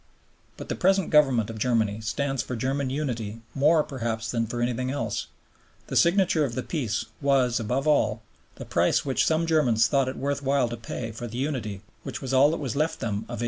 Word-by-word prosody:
But - - -8
the - - -2
present 190 -1 +2
Government 130 -8 +4
of 110 - -8
Germany 110 -3 +1
stands 135 +4 -1
for 125 0 -5
German 135 +3 -1
unity 115 -6 -3
more 150 +3 +4
perhaps 115 -5 -3
than 115 -2 0
for 120 +2 -4
anything 125 +1 -1
else; 115 -6 -2 0.6
the - - -4
signature 175 -3 +4
of 125 -5 -2
the 130 - -2
Peace 125 -10 -2 0.2
was, 130 -4 +2
above 125 +6 -1
all, 110 -7 +2 0.3
the - - -8
price - - +1
which 135 -2 +1
some 160 +1 +2
Germans 130 -9 +3
thought 135 -2 +2
it 130 - -6
worth 140 +1 -2
while 135 -3 +1
to 120 - -4
pay 115 0 -5
for 115 +2 -6
the 120 +1 -7
unity 120 -8 -3 0.2
which - - -6
was 135 -1 -4
all 135 +2 +6
that 165 - -1
was 135 -6 -4
left 155 +3 0
them 115 - -2 0.2
of - - -5
1870. - - -8
130 Hz, 210 wpm, -26 LUFS, 115-145 Hz, 0.6 s, all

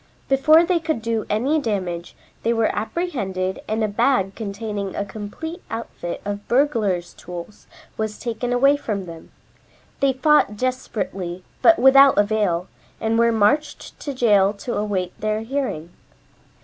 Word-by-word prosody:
Before 310 +5 +5
they 355 -1 +2
could 315 -5 -2
do 230 -2 -1
any 265 +9 +1
damage 185 - -3 0.3
they 230 - +1
were 225 -1 +1
apprehended 200 - -2
and 220 +1 -1
a - - +2
bag 205 -2 +1
containing 205 -2 -5
a 200 - -2
complete 215 - -7
outfit 225 -6 -5
of 205 0 -5
burglar's 225 -10 +1
tools 180 +4 -10 0.3
was 220 -1 -3
taken 240 +1 -3
away 275 +4 +4
from 205 -8 -3
them. 165 -2 -11 0.7
They 275 -1 +3
fought 260 -6 +3
desperately, 195 -7 -3 0.2
but 335 - +6
without 270 +2 +7
avail, 205 -4 +1 0.3
and 225 +1 0
were 235 0 +4
marched 230 +8 0
to 285 - -4
jail 205 -5 +4
to 215 +4 -5
await 195 -4 -2
their 215 0 0
hearing. 225 - -3
220 Hz, 140 wpm, -22 LUFS, 200-265 Hz, 0.7 s, without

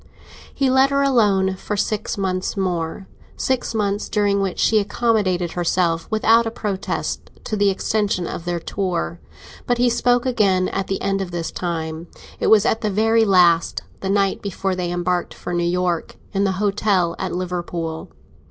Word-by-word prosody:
He 270 -2 +1
let 265 +1 +5
her 280 0 +2
alone 205 -8 +3
for 210 +2 -4
six 210 +1 -1
months 185 0 -2
more—six 190 +7 -3
months 205 -1 -1
during 205 -1 +1
which 195 -2 -2
she 220 - +3
accommodated 200 -5 0
herself 170 -1 0
without 225 +1 +4
a - - 0
protest 205 -4 -3
to 215 - -3
the 205 -1 +3
extension 195 -2 0
of 165 - -5
their 175 -1 -1
tour. 165 - -3 0.5
But 245 - +2
he 245 0 +3
spoke 245 +1 +2
again 195 -7 +2
at 195 -1 -3
the 195 - -2
end 195 0 0
of 190 - -4
this 170 -1 -4
time; 165 -1 -4 0.3
it - - 0
was 215 -2 +6
at 225 - +1
the 215 - 0
very 225 +3 +3
last, 175 -4 +3 0.2
the 190 - -3
night 195 -1 +1
before 195 -1 -2
they 180 -1 -2
embarked 175 0 -1
for 175 - -6
New 175 0 0
York, 180 -1 -1 0.2
in 200 0 +1
the 190 - +1
hotel 195 -3 +1
at 185 -2 -3
Liverpool. 175 -3 -4
195 Hz, 170 wpm, -21 LUFS, 175-215 Hz, 0.5 s, was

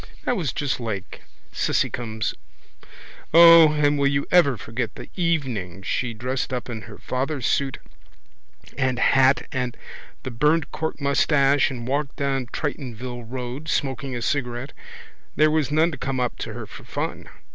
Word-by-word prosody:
That 250 - +1
was 160 - -1
just 135 -4 -2
like 110 -5 -5 0.3
Cissycums. 110 -2 -1 1.0
O, 165 -2 +9
and 145 -1 +2
will 140 - +3
you 140 0 0
ever 155 -8 +5
forget 115 +1 -3
her - - -7
the - - -14
evening 130 - -1
she 120 +2 -2
dressed 130 +4 -3
up 125 -1 -3
in 110 -2 -5
her - - -10
father's 135 0 -3
suit 140 -1 0 1.0
and 130 -2 +1
hat 135 +1 +4
and 125 -2 -3 0.5
the 130 - -5
burned 150 +5 +1
cork 160 -1 -3
moustache 140 -1 +3
and 120 -3 -6
walked 140 +1 -1
down 135 -3 -1
Tritonville 125 -4 -5
road, 130 +4 -5
smoking 135 -2 -1
a 120 - -3
cigarette. 125 -1 -2 0.6
There 155 0 +4
was 155 -3 +1
none 160 +3 +3
to 145 - -7
come 135 -1 -2
up 125 -1 -1
to - - -5
her - - -6
for - - -12
fun. - - -5
135 Hz, 155 wpm, -24 LUFS, 125-150 Hz, 1.0 s, O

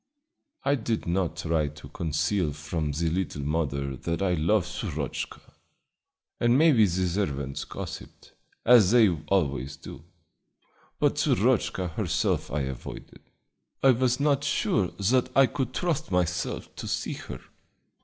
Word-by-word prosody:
I 140 - +2
did 115 -4 -1
not 85 -1 0
try 80 -4 0
to 75 0 -10
conceal 80 +2 -1
from 75 +1 -3
the 80 +4 -1
little 80 -4 -2
mother 70 -3 -1
that 85 +4 -3
I 90 -2 +2
loved 85 +4 +2
Shurochka, 90 - -4 1.0
and 120 +1 +4
maybe 140 -9 +5
the 90 +1 0
servants 70 -7 -2
gossiped, - - -9 0.3
as 115 -6 +7
they 115 -2 +6 0.2
always 70 -8 0
do; 75 - -10 1.0
but - - +2
Shurochka 90 -2 +1
herself - - 0
I 75 - -1
avoided. 65 -2 -7 0.6
I 135 - +7
was 125 +1 +1
not 145 -1 +2
sure 110 -8 +1
that 125 +6 +2
I 135 - +8
could 130 +1 -3
trust 170 0 -1
myself 90 -1 -1
to - - -6
see - - -2
her. - - -8
90 Hz, 135 wpm, -27 LUFS, 75-115 Hz, 1.0 s, I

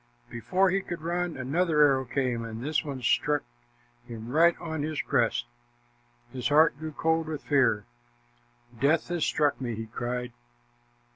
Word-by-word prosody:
Before 185 - +1
he 195 +1 +1
could 175 -3 -6
run, 175 -1 -2
another 150 +4 +1
arrow 135 -2 +3
came, 125 -2 -1
and 115 +1 -6
this 155 +2 0
one 140 -4 -6
struck 145 +4 +2 0.6
him 115 0 -8
right 165 +5 +4
on 160 -3 -4
his 155 0 -3
crest. - - +1 0.9
His 125 -2 -2
heart 150 +1 +5
grew 155 0 -5
cold 160 +1 0
with 155 -2 -5
fear. 130 -7 +2 0.9
"Death 155 +5 +2
has 175 -2 -1
struck 145 -3 +1
me," 120 -3 -3
he 115 +1 -5
cried. 120 +2 -4
145 Hz, 150 wpm, -28 LUFS, 125-160 Hz, 0.9 s, heart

